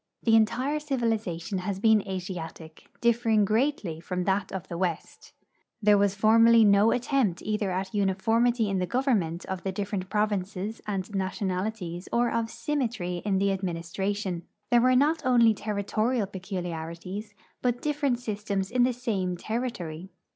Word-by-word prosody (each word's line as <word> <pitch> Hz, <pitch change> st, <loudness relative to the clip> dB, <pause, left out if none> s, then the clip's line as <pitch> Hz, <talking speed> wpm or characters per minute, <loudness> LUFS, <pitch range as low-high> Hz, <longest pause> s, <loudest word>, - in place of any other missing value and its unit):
The 225 Hz, -1 st, +4 dB
entire 255 Hz, +7 st, +2 dB
civilization 225 Hz, -, -2 dB
has 185 Hz, +1 st, -3 dB
been 220 Hz, 0 st, +5 dB
Asiatic, 175 Hz, -4 st, -7 dB
differing 230 Hz, -3 st, +3 dB
greatly 215 Hz, -, 0 dB
from 180 Hz, +2 st, -3 dB
that 195 Hz, +2 st, 0 dB
of 190 Hz, -1 st, -5 dB
the 170 Hz, -, -6 dB
west. 175 Hz, -3 st, -3 dB, 0.5 s
There 210 Hz, -1 st, +5 dB
was 200 Hz, -1 st, +2 dB
formerly 225 Hz, +2 st, +6 dB
no 200 Hz, +2 st, +5 dB
attempt 245 Hz, -7 st, 0 dB
either 210 Hz, -2 st, -1 dB
at 190 Hz, +1 st, -3 dB
uniformity 225 Hz, +4 st, +2 dB
in 195 Hz, -1 st, 0 dB
the 180 Hz, -, -1 dB
government 210 Hz, -, 0 dB
of 190 Hz, -1 st, -4 dB
the 195 Hz, -, -2 dB
different 190 Hz, -1 st, -3 dB
provinces 210 Hz, 0 st, -1 dB
and 195 Hz, -1 st, -3 dB
nationalities 190 Hz, -1 st, -3 dB
or 240 Hz, 0 st, +2 dB
of 230 Hz, -1 st, -1 dB
symmetry 235 Hz, -, -2 dB
in 200 Hz, -2 st, +1 dB
the 195 Hz, 0 st, +2 dB
administra 185 Hz, +2 st, -2 dB
tion. 190 Hz, -4 st, -3 dB, 0.3 s
There 240 Hz, -1 st, +6 dB
were 255 Hz, +1 st, +4 dB
not 300 Hz, +5 st, +3 dB
only 240 Hz, -3 st, +5 dB
territorial 215 Hz, +3 st, -1 dB
peculiarities, 185 Hz, +1 st, -6 dB, 0.3 s
but 245 Hz, -1 st, 0 dB
different 290 Hz, -4 st, 0 dB
systems 205 Hz, -4 st, -3 dB
in 250 Hz, 0 st, +2 dB
the 250 Hz, +1 st, +3 dB
same 200 Hz, -7 st, -2 dB
territory. 190 Hz, -7 st, -4 dB
205 Hz, 145 wpm, -27 LUFS, 185-230 Hz, 0.5 s, formerly